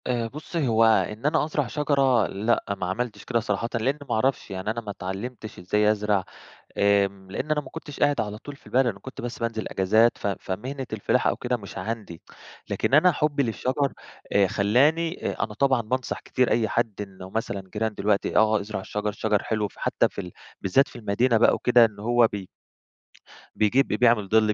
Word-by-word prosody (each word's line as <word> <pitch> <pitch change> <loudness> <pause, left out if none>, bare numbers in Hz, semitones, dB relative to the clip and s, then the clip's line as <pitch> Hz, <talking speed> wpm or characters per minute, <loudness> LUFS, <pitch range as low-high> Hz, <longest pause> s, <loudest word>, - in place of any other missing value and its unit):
آآ 120 -2 0
بُصّي، 150 +3 -3
هو 115 -1 +4
إن 110 +1 +2
أنا 150 0 +2
أزرع 150 -3 -1
شجرة 135 -5 +2
لأ 100 0 -1
ما 95 - -3
عملتش 105 +2 -3
كده 120 -1 +1
صراحةً 110 +1 -2
لإن 130 +6 0
ما - - +1
أعرفش. 130 -1 0
يعني 95 +3 -3
أنا 115 +1 -4
ما 105 -2 -6
اتعلّمتش 105 +4 -6
إزاي 105 +4 +2
أزرع 105 -2 0 0.6
آمم 100 -1 +2
لإن 140 +9 -4
أنا 150 -1 +2
ما 135 -3 -12
كنتش 160 -3 -9
قاعد 145 0 +3
على 105 0 -4
طول 145 +5 -10
في - - -27
البلد، 130 +1 +2
أنا 105 -5 -2
كنت 130 +6 -9
بس 120 0 -5
بانزل 115 -1 -3
إجازات 110 +5 +3
ف - - -4
فمهنة 125 +7 -4
الفِلاحة 110 -2 +1
أو - - -3
كده 125 0 -1
مش 100 -4 -9
عندي. 105 -4 -5 0.5
لكن - - 0
أنا 175 +5 +6
حُبّي 145 -2 +1
للشَجَر 130 +3 -1 0.4
آآ 100 -1 +4
خلّاني 145 - +2
آآ - - -2
أنا 105 - -7
طبعًا 130 0 +2
بانصح 125 +4 -3
كتير 125 -1 0
أي 115 -2 +2
حد 115 +1 0
إنه 95 -2 -8
مثلًا 100 -2 -3
جيران 110 0 -1
دلوقت 100 0 +1
آه، 110 -1 +3
ازرع 105 0 -5
الشَجَر، 105 +2 -3
الشَجَر 105 0 0
حلو 105 -2 -1
فحتّى - - 0
في - - -7
ال 90 -2 -8 0.3
بالذات 135 +9 +3
في - - -13
المدينة 115 +2 +1
بقى 115 - +5
وكده 120 -1 +5
إن 110 -3 -2
هو 120 +2 +4
بي 100 -2 -6 1.1
بيجيب 125 +6 +3
ب - - -3
بيعمل 115 -5 +3
ضِل، 110 0 +4
110 Hz, 195 wpm, -25 LUFS, 100-130 Hz, 1.1 s, أنا